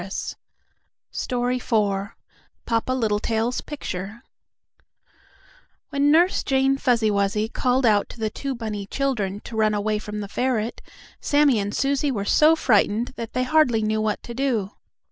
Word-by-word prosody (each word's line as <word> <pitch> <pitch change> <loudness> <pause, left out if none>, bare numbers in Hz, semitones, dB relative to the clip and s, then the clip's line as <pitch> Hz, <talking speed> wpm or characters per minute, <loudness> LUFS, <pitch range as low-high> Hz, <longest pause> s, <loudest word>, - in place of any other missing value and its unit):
IV 195 +2 -7 2.5
PAPA 230 +2 0
LITTLETAIL'S 225 0 0
PICTURE 220 -6 -6 1.7
When 285 0 +2
Nurse 340 +5 +4
Jane 270 0 +2
Fuzzy 235 -5 +2
Wuzzy 200 +1 0
called 250 +2 0
out 210 -3 +3
to - - -12
the 220 -1 -1
two 275 +3 -4
bunny 210 -4 -5
children 210 -7 -2
to 235 - -9
run 215 -1 +2
away 210 +1 0
from 210 0 -6
the 200 - -5
ferret, 240 0 -1 0.4
Sammie 285 -5 +3
and 205 0 -3
Susie 280 +1 +1
were 205 -7 -2
so 310 +8 +5
frightened 230 -4 +2
that 230 -1 -6
they 255 - 0
hardly 255 -5 +3
knew 215 0 0
what 215 -1 -1
to. 235 -5 -2
230 Hz, 135 wpm, -23 LUFS, 210-265 Hz, 2.5 s, so